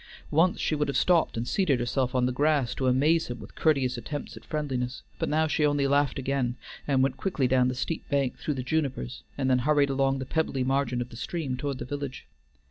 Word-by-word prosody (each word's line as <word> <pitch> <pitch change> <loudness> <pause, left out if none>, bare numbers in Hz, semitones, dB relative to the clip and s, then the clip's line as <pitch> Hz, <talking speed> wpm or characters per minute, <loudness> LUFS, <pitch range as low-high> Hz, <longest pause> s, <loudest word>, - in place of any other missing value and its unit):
Once 170 +4 +3
she - - 0
would 150 -1 +1
have 140 - 0
stopped 170 -8 +3
and 115 +1 -2
seated 155 -9 +2
herself 125 +1 -1
on 125 -1 +3
the 125 - +1
grass 140 -2 +2
to 130 - -1
amaze 150 +6 +3
him 120 -1 -6
with - - -11
courteous 135 -6 +1
attempts 145 +5 -6
at - - -11
friendliness, 130 -5 -3 0.2
but - - -1
now 155 +1 +2
she 155 0 0
only 145 -1 +2
laughed 140 -1 +2
again, 130 -2 -1 0.3
and 135 -2 +3
went 135 0 0
quickly 145 -5 0
down 125 0 +3
the 130 - -1
steep 160 +6 -3
bank 140 -3 +1
through 150 - -2
the 130 - -3
junipers 130 - -2 0.2
and 135 -2 0
then 130 -1 +4
hurried 145 +1 +3
along 135 0 +2
the 130 - -4
pebbly 140 -3 0
margin 130 -2 0
of 120 - -4
the - - -11
stream 140 +1 -3
toward 140 +1 -3
the 120 - -5
village. 140 -1 -5
135 Hz, 225 wpm, -27 LUFS, 125-150 Hz, 0.3 s, then